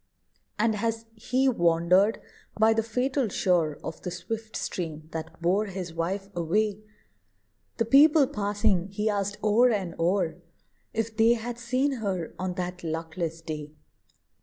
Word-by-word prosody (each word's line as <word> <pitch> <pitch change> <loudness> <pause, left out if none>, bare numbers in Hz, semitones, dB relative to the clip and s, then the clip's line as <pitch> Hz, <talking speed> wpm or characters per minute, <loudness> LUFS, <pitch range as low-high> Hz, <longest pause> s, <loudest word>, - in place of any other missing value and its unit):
And 220 0 +2
as 225 +1 -2
he 250 +4 0
wandered 180 0 +3 0.4
by 220 +1 +6
the 225 - +2
fatal 250 +3 0
shore 175 -6 +1
Of 160 - -6
the 180 - -4
swift 220 +5 -6
stream 155 -3 -4
that 160 0 -6
bore 195 +5 +2
his 185 -3 -6
wife 185 +4 -2
away, 200 +5 0 1.0
The 230 - +1
people 290 +4 +6
passing 205 -6 0
he 210 +2 -1
asked 205 0 -2
o'er 220 +4 +5
and 195 -7 -1
o'er, 170 0 0 0.5
If 225 0 -2
they 225 +1 +5
had 235 +1 -4
seen 255 +4 +1
her 185 -6 -2
on 185 -1 -2
that 180 0 -4
luckless 165 0 -4
day. 150 -2 -6
200 Hz, 140 wpm, -27 LUFS, 170-225 Hz, 1.0 s, by